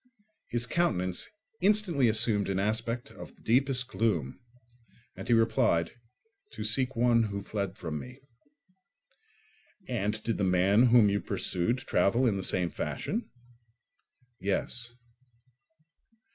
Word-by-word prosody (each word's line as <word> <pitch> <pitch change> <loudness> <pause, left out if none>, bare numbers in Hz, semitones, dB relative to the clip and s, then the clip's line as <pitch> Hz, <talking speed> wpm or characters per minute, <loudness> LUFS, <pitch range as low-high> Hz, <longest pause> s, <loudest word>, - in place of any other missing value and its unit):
His 120 0 0
countenance 95 - 0 0.3
instantly 185 - +3
assumed 105 -2 +2
an 95 - -1
aspect 115 +4 -2
of - - -11
the - - -24
deepest 125 +1 +2
gloom, 105 - -1 0.8
and - - -8
he 120 - +3
replied, 115 -7 +2 0.6
"To - - -5
seek 130 -1 +1
one 120 0 +3
who 100 -1 -4
fled 100 -1 -4
from 80 -5 -4
me." 125 - -10 1.7
"And 110 -2 -2
did 115 -1 -2
the - - +1
man 95 +6 +4
whom 115 -4 +5
you 100 - 0
pursued 95 +8 -1
travel 120 0 +1
in 110 -5 +2
the 95 - -2
same 90 -2 0
fashion?" 135 - -3 1.1
"Yes." 115 +4 -2
115 Hz, 120 wpm, -29 LUFS, 100-125 Hz, 1.7 s, whom